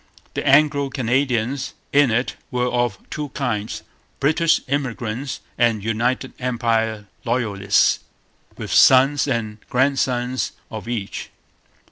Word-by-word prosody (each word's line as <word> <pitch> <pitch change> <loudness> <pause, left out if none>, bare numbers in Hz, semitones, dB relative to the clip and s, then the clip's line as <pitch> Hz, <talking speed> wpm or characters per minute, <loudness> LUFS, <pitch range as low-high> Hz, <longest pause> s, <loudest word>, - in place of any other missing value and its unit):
The - - -3
Anglo 140 0 +4
Canadians 130 0 0 0.2
in 145 -2 +5
it 120 +3 0
were 125 -1 0
of 120 -4 0
two 150 -1 -4
kinds: 115 -6 -2 0.4
British 160 +3 +3
immigrants 130 -2 -3 0.2
and 115 -4 +2
United 120 +4 -1
Empire 115 -4 0 0.2
Loyalists, 105 -5 +2 0.6
with - - -5
sons 135 +3 +6
and 110 -4 -2
grandsons 130 -1 0 0.2
of 110 0 -7
each. 110 -5 -4
125 Hz, 105 wpm, -21 LUFS, 115-135 Hz, 0.6 s, sons